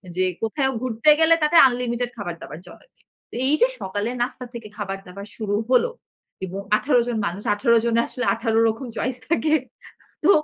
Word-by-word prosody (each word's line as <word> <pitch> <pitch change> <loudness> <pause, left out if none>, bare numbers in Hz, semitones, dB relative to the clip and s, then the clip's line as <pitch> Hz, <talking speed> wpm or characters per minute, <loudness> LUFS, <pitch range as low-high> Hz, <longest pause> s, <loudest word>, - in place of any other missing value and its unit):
যে 185 - +1 0.2
কোথায়ও 265 +4 0
ঘুরতে 250 +3 +1
গেলে 325 +1 +6
তাতে 300 +3 +2
আনলিমিটেড 245 -1 -2
খাবার-দাবার 170 -5 -7
চলে। - - -15 0.4
তো - - -11
এই 285 - +3
যে - - +6
সকালের 205 +6 -3
নাস্তা 250 +1 -3
থেকে 230 -2 -8
খাবার 195 -2 -4
দাবার 200 +3 -9
শুরু 205 -2 -2
হল। 260 - +5 0.6
এবং 190 +2 -6 0.2
১৮ 255 -3 +2
জন 240 -2 -1
মানুষ, 185 +4 -6
১৮ 235 +2 +3
জনের 235 0 +2
আসলে 255 - -4
১৮ 225 -2 0
রকম 225 +4 -4
চয়েস 255 0 -2
থাকে। 315 -2 +1 0.7
তো 385 - +6
235 Hz, 175 wpm, -23 LUFS, 205-260 Hz, 0.7 s, গেলে